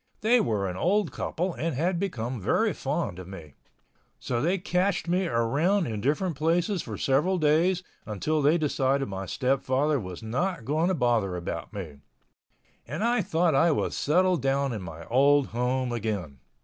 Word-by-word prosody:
They 235 Hz, +3 st, +4 dB
were 105 Hz, -, 0 dB
an 90 Hz, -, -4 dB
old 190 Hz, -, +1 dB
couple 180 Hz, +2 st, -2 dB
and 160 Hz, -3 st, -2 dB
had 170 Hz, +5 st, 0 dB
become 125 Hz, -, -3 dB
very -, -, +1 dB
fond 90 Hz, -, -3 dB
of 90 Hz, -, -9 dB
me. 85 Hz, -7 st, -10 dB, 0.7 s
So 120 Hz, -1 st, -2 dB
they 175 Hz, +6 st, +1 dB
cached 180 Hz, -1 st, 0 dB
me 180 Hz, +1 st, +1 dB
around 160 Hz, -, +1 dB
in 110 Hz, -6 st, -4 dB
different 155 Hz, -, 0 dB
places 170 Hz, +5 st, +1 dB
for 110 Hz, -3 st, -6 dB
several 150 Hz, +8 st, +2 dB
days 170 Hz, +4 st, +2 dB, 0.2 s
until 150 Hz, +9 st, -1 dB
they 150 Hz, +4 st, +4 dB
decided 140 Hz, -3 st, 0 dB
my 95 Hz, -1 st, -5 dB
stepfather 135 Hz, -, +1 dB
was 90 Hz, -1 st, -7 dB
not 140 Hz, +6 st, -2 dB
going 155 Hz, +6 st, +1 dB
to 190 Hz, -, +1 dB
bother 115 Hz, -, +1 dB
about 85 Hz, -1 st, -5 dB
me—and 100 Hz, -, -10 dB
I 240 Hz, 0 st, +2 dB
thought 165 Hz, -1 st, +1 dB
I 160 Hz, +5 st, +4 dB
was 155 Hz, -, 0 dB
settled 180 Hz, +2 st, +2 dB
down 135 Hz, 0 st, +1 dB
in 105 Hz, -, -4 dB
my 85 Hz, -2 st, -8 dB
old 140 Hz, -, +3 dB
home 125 Hz, +1 st, -1 dB
again. 100 Hz, -, -3 dB
140 Hz, 165 wpm, -27 LUFS, 115-175 Hz, 0.7 s, They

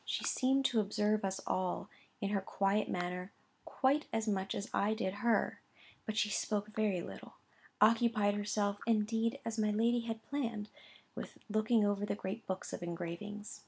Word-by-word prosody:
She -, -, -2 dB
seemed 270 Hz, +1 st, +2 dB
to 235 Hz, -, +3 dB
observe 210 Hz, +1 st, +1 dB
us 190 Hz, 0 st, -1 dB
all, 185 Hz, 0 st, -1 dB, 0.3 s
in 200 Hz, -, 0 dB
her 200 Hz, -1 st, +1 dB
quiet 195 Hz, +2 st, +1 dB
manner, 180 Hz, +1 st, -2 dB, 0.3 s
quite 275 Hz, +3 st, +2 dB
as 225 Hz, 0 st, 0 dB
much 195 Hz, -2 st, 0 dB
as 200 Hz, -, -3 dB
I 210 Hz, +2 st, +2 dB
did 190 Hz, -4 st, -1 dB
her; 235 Hz, -2 st, +2 dB, 0.5 s
but 215 Hz, 0 st, -2 dB
she 210 Hz, -, +3 dB
spoke 210 Hz, 0 st, -1 dB
very 210 Hz, -4 st, +1 dB
little; -, -, -9 dB, 0.4 s
occupied 220 Hz, -1 st, +4 dB
herself, 205 Hz, 0 st, 0 dB
indeed, 225 Hz, +2 st, +2 dB
as 225 Hz, -1 st, -2 dB
my 215 Hz, -1 st, +3 dB
lady 230 Hz, +3 st, +3 dB
had 225 Hz, -1 st, -4 dB
planned, 230 Hz, -7 st, -3 dB, 0.4 s
with -, -, -7 dB
looking 215 Hz, 0 st, +3 dB
over 205 Hz, 0 st, +1 dB
the 205 Hz, -, 0 dB
great 205 Hz, +2 st, -5 dB
books 190 Hz, 0 st, -3 dB
of -, -, -4 dB
engravings. 175 Hz, +5 st, -5 dB
210 Hz, 165 wpm, -35 LUFS, 200-225 Hz, 0.5 s, occupied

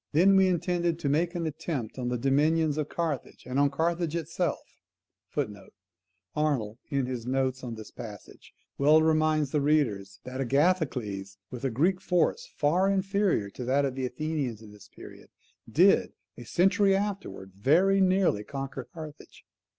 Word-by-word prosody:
Then 190 Hz, +6 st, +5 dB
we 190 Hz, 0 st, +5 dB
intended 175 Hz, -1 st, 0 dB
to 150 Hz, -4 st, -2 dB
make 170 Hz, +5 st, +1 dB
an 170 Hz, -1 st, -2 dB
attempt 140 Hz, -6 st, -4 dB
on 125 Hz, -, -2 dB
the 125 Hz, 0 st, -1 dB
dominions 150 Hz, +4 st, +2 dB
of 150 Hz, -, -2 dB
Carthage, 160 Hz, -6 st, -4 dB
and 130 Hz, +2 st, -1 dB
on 145 Hz, 0 st, +4 dB
Carthage 165 Hz, +3 st, -1 dB
itself. 170 Hz, +1 st, -3 dB, 1.6 s
[Arnold, 130 Hz, -8 st, -1 dB
in 140 Hz, -3 st, 0 dB
his 125 Hz, -2 st, -5 dB
notes 130 Hz, 0 st, 0 dB
on 120 Hz, -2 st, -5 dB
this 110 Hz, -1 st, -10 dB
passage, 105 Hz, -4 st, -11 dB, 0.3 s
well 155 Hz, +3 st, +5 dB
reminds 155 Hz, -2 st, +2 dB
the 150 Hz, -, +1 dB
reader 140 Hz, -9 st, +2 dB, 0.2 s
that 130 Hz, +1 st, -5 dB
Agathocles, 125 Hz, -, 0 dB
with 125 Hz, 0 st, -7 dB
a 135 Hz, -, +1 dB
Greek 170 Hz, +10 st, +1 dB
force 185 Hz, -, +1 dB
far 180 Hz, +6 st, +2 dB
inferior 195 Hz, -, +1 dB
to 125 Hz, -, -7 dB
that 140 Hz, +3 st, +2 dB
of 135 Hz, -, -2 dB
the 130 Hz, -1 st, -2 dB
Athenians 130 Hz, -5 st, -3 dB
at 105 Hz, -, -13 dB
this 105 Hz, -1 st, -15 dB
period, -, -, -13 dB, 0.4 s
did, -, -, +4 dB, 0.2 s
a 120 Hz, -, -10 dB
century 195 Hz, -, +3 dB
afterwards, 195 Hz, -, -4 dB
very 180 Hz, -, +3 dB
nearly 185 Hz, -, +2 dB
conquer 135 Hz, +1 st, -6 dB
Carthage. 155 Hz, -3 st, -11 dB
150 Hz, 155 wpm, -28 LUFS, 125-170 Hz, 1.6 s, Then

